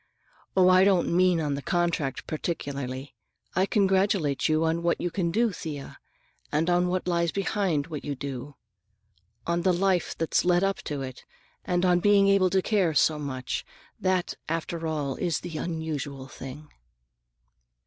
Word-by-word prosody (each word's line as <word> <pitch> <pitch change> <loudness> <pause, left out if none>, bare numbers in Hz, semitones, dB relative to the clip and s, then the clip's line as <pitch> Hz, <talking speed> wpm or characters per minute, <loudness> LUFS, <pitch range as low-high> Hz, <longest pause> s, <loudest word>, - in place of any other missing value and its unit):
"Oh, 185 -1 +6
I 185 0 +6
don't 190 -4 +3
mean 180 -1 +4
on 150 -3 -1
the 140 - -3
contract 170 -6 -1
particularly. 140 -4 -4 0.4
I 185 +2 +3
congratulate 190 - +2
you 155 +1 +2
on 165 +1 0
what 170 0 +1
you 175 - -2
can 175 -2 0
do, 225 +6 +2
Thea, 150 -6 -7 0.5
and 160 +4 +1
on 175 0 +3
all 180 - -1
that 185 0 -2
lies 170 -2 +1
behind 195 -7 0
what 155 -3 -6
you 145 -1 -3
do. 135 +1 -6 0.9
On 170 0 0
the 185 +1 +3
life 180 0 +1
that's 165 - +1
led 180 +1 +3
up 195 0 +1
to 145 -2 -3
it, 130 -1 -8 0.4
and 180 -1 +1
on 175 -1 +4
being 200 +1 +5
able 195 -2 +4
to 190 0 +1
care 190 -8 +1
so 155 +1 +3
much. 130 -3 -3 0.4
That, 185 -1 0 0.2
after 165 0 -2
all, 145 -4 -2
is 175 -3 -1
the 170 -3 -6
unusual 150 -5 -4
thing." 135 +3 -9
170 Hz, 165 wpm, -27 LUFS, 145-185 Hz, 0.9 s, Oh